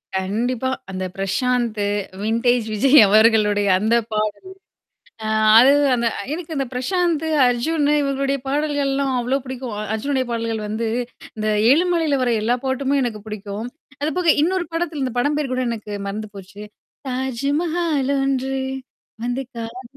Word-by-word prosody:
கண்டிப்பா. 230 +7 -1 0.2
அந்த 185 0 -3
பிரசாந்த் 230 +3 -1 0.4
வின்டேஜ் 230 +2 +1
விஜய் 270 +7 +5
அவர்களுடைய 210 -1 +4
அந்த 220 +3 +2 0.2
பாடல். 215 -1 -1 0.9
ஆ - - -2 0.3
அது 260 +3 +7 0.2
அந்த 235 -1 0 0.3
எனக்கு 330 0 -6
இந்த 270 - 0
பிரசாந்த், 330 +4 0 0.2
அர்ஜுனு 290 +5 +1
இவர்களுடைய 275 0 -1
பாடல்கள்லாம் 280 -2 0
அவ்ளோ 250 +3 0
பிடிக்கும். 255 -2 -6 0.2
அர்ஜுனுடைய 260 +4 -1
பாடல்கள் 230 -1 -2
வந்து 220 +2 -2 0.5
இந்த 215 0 -2 0.2
எழுமலையில 325 -3 +2
வர 245 - +1
எல்லா 235 +3 +2
பாட்டுமே 270 +1 0
எனக்கு 220 -4 -3
புடிக்கும். 210 +1 -6 0.3
அதுபோக 315 +2 +2
இன்னொரு 360 +2 +1
படத்தில 330 -4 -2
இந்த 255 -2 -2
படம் 290 +3 +1
பேர் 285 -4 -2
கூட 255 - -1
எனக்கு 215 -2 -5 0.2
மறந்து 215 +2 -5
போச்சு. 195 +1 -11 0.5
தாஜ்மஹாலொன்று 275 0 -1 0.7
வந்து 245 +2 -2
காதல் 230 +2 -6
255 Hz, 125 wpm, -21 LUFS, 220-285 Hz, 0.9 s, அது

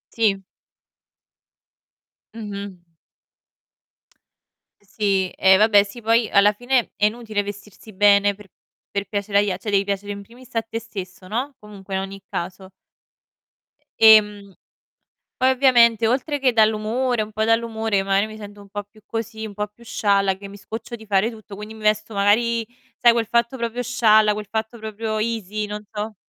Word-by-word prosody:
Sì. 200 -4 +1 1.9
Mh-mh. 200 -3 -7 2.0
Sì, 195 -2 -1
eh 190 0 +5
vabbè, 210 -1 +5
sì 205 +4 -11
poi 225 0 +2
alla 200 +1 +5
fine 245 +2 0
è 210 - +3
inutile 215 -1 -1
vestirsi 205 +1 -10
bene 200 0 +4
per 210 -1 -15 0.5
per 200 0 -1
piacere 200 0 0
agli 205 0 +1
a 180 - -2
cioè, 210 +2 -5
devi 195 0 +3
piacere 200 0 -3
in 200 0 -6
primis 240 +5 -17
a 225 - +1
te 225 +1 -6
stesso, 185 -5 -9
no, 255 +6 -3
comunque, 200 -2 -9
in 190 - 0
ogni 195 0 -8
caso. 185 +2 -5 1.3
Ehm, 210 -3 +5 0.8
poi 260 0 +3
ovviamente 240 -4 +4
oltre 275 +5 0
che 260 -2 +2
dall'umore 220 +2 +1
un 215 0 -8
po' 215 +1 0
dall'umore, 225 -3 +1
magari, 195 +2 +1
mi 215 - -10
sento 205 -1 -11
un 200 - -15
po' 205 0 -6
più 215 +2 -22
così, 225 -1 -5
un 205 - -9
po' 210 +1 -2
più 220 +3 -20
scialla 200 -4 +1
che 200 +1 -10
mi 200 - -11
scoccio 225 +4 -8
di 220 - -14
fare 200 +3 +2
tutto, 215 -3 -11
quindi 210 +1 -9
mi 220 - -12
vesto, 215 +1 0
magari, 225 +3 +2 0.3
sai 235 -1 +6
quel 230 -2 0
fatto 235 +3 +1
proprio 235 +1 -3
scialla, 220 -3 +4
quel 210 -1 -6
fatto 220 +2 -4
proprio 220 0 -4
easy, 215 -2 -2
non 210 0 -6
so 210 +1 -4
215 Hz, 165 wpm, -22 LUFS, 200-230 Hz, 2.0 s, sai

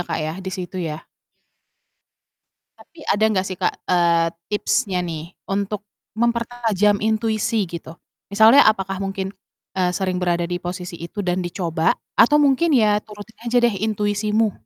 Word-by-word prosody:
Kak, - - -4
ya, 155 0 -3
di 190 - -5
situ 185 0 -5
ya? 160 -1 -5 1.7
Tapi 335 - -20
ada 205 - +1
gak 185 0 +1
sih 185 - -5
Kak, 185 - +1
eee, 170 -2 +3 0.2
tipsnya 205 -1 0
nih 165 0 -6 0.2
untuk 200 +1 -2 0.3
mempertajam 230 -3 +1
intuisi 220 0 0
gitu, 165 -2 -8 0.4
misalnya 220 +7 +7
apakah 195 -2 -1
mungkin, 195 0 -3 0.4
eee, 180 -1 +1
sering 185 -2 -1
berada 175 -1 +1
di 175 - -2
posisi 180 0 -6
itu 170 +5 -6
dan 180 +1 0
dicoba 170 -2 0 0.2
atau 295 +6 +6
mungkin 290 +3 +3
ya 210 -3 +3
turutin 210 +1 -12
aja 240 +1 0
deh 240 - +4
intuisimu? 210 0 0
195 Hz, 145 wpm, -21 LUFS, 180-220 Hz, 1.7 s, misalnya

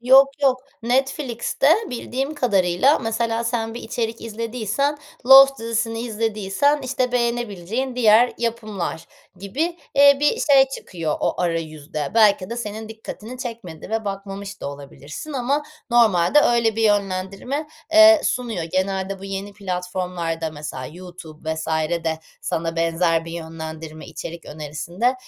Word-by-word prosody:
Yok, 265 +3 +7
yok. 260 -2 +4 0.2
Netflix'te 265 +1 0 0.2
bildiğim 265 +4 -3
kadarıyla 205 - +3
mesela 225 0 -1
sen 230 -1 -2
bir 240 - -7
içerik 230 -1 -3
izlediysen, 230 +5 -2 0.3
Lost 270 +1 +9
dizisini 225 0 -2
izlediysen, 225 +4 0
işte, 255 -1 -1
beğenebileceğin 235 0 -1
diğer 235 0 +5
yapımlar 215 -8 -3 0.3
gibi, 285 - -2 0.2
eee, 280 0 +7
bir 295 - +2
şey 270 -2 +5
çıkıyor 165 - -4
o - - -1
arayüzde. 155 -4 -3
Belki 210 -3 +4
de 235 - -3
senin 220 -1 -5
dikkatini 220 +2 -9
çekmedi 225 -11 -7
ve 220 0 -1
bakmamış 195 0 -6
da - - -4
olabilirsin 140 - -9
ama 275 +3 0 0.3
normalde 230 +1 +5
öyle 230 -4 +2
bir 225 - 0
yönlendirme, 200 +7 0 0.3
eee, 325 0 +8
sunuyor. 240 -7 -1
Genelde 190 +2 -2
bu 195 - -10
yeni 195 +1 -5
platformlarda 180 -4 -3
mesela 145 -4 -6
YouTube 165 -2 -7
vs. 160 0 -5 0.4
de 160 -1 -1 0.2
sana 165 0 -2
benzer 165 0 +1
bir 165 - -8
yönlendirme, 160 -1 -7
içerik 170 0 -8
önerisinde, 160 - -2
215 Hz, 130 wpm, -22 LUFS, 175-245 Hz, 0.4 s, Lost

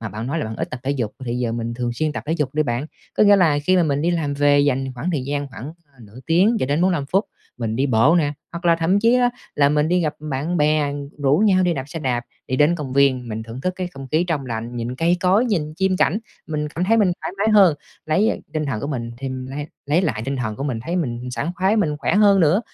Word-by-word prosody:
Mà 110 - -4
bạn 110 +3 -6
nói 150 +5 -2
là - - -2
bạn 110 0 -5
ít - - -4
tập 125 - -6
thể 135 - -1
dục, 120 -7 -2
thì 120 - -3
giờ 120 -2 -1
mình 115 0 -3
thường 120 -1 -2
xuyên 155 +4 -1
tập - - -5
thể 155 - 0
dục 150 -4 -2
đi 155 - +2
bạn. 125 +2 -2 0.3
Có - - +3
nghĩa 205 -1 +7
là 160 -6 +3
khi 185 +3 +3
mà 180 - +4
mình 145 -3 0
đi 170 - +2
làm 155 -4 -1
về, 145 0 +4
dành 135 -2 0
khoảng 160 +9 -3
thời 140 -6 -2
gian 145 0 -3
khoảng 130 +5 -8 0.3
nửa 110 +2 -14
tiếng 190 +8 +3
cho - - +1
đến 145 +4 0
45 175 -7 +1
phút, 195 +7 +1 0.3
mình 115 -2 -3
đi 135 +3 +1
bộ 130 +6 +4
nè, 145 -2 0 0.2
hoặc 170 +1 -7
là 170 -1 +4
thậm 175 +5 +2
chí 230 +3 +4
á 245 -1 +3 0.2
là 140 -1 +4
mình 150 +1 +1
đi 180 +1 +2
gặp 155 -3 -1
bạn 155 +3 -3
bè, 150 -1 +2 0.3
rủ 140 +1 +3
nhau 195 -3 +4
đi 175 -1 +2
đạp 130 - -4
xe 165 - -6
đạp, 125 -5 -1 0.3
đi 130 - -1
đến 150 +5 +4
công 145 -6 -5
viên, 130 -3 +2
mình 110 0 -4
thưởng 115 +3 -8
thức 185 +4 -1
cái 185 -1 -3
không 135 -6 -10
khí 160 +6 +1
trong 145 -5 -1
lành, 115 0 -5
nhìn 120 +1 -3
cây 170 +5 +2
cối, 190 +5 +3
nhìn 160 -10 -1
chim 190 +1 +1
cảnh. 180 +4 +2 0.3
Mình 150 -1 -2
cảm 170 +4 -2
thấy 225 +4 +3
mình 200 -5 +3
thoải - - -4
mái 215 +2 +2
hơn, 195 -7 +6 0.3
lấy 190 +8 +2
á - - 0 0.2
tinh 155 -2 -2
thần 120 -6 -2
của 140 - -3
mình 120 -5 -4
thì 135 - -4
mình 130 0 -5
lấy 145 +2 -5 0.2
lấy 155 +5 +2
lại 110 - -1
tinh 135 0 -2
thần 110 -4 -3
của 135 - -4
mình, 125 -6 -2
thấy 170 +8 -3
mình 125 -6 -3
sảng 125 +7 -2
khoái, 190 +4 +1
mình 155 -9 +1
khỏe 145 +3 -1
hơn 200 -2 +5
nữa, 170 +6 +4
150 Hz, 285 wpm, -21 LUFS, 130-175 Hz, 0.3 s, nghĩa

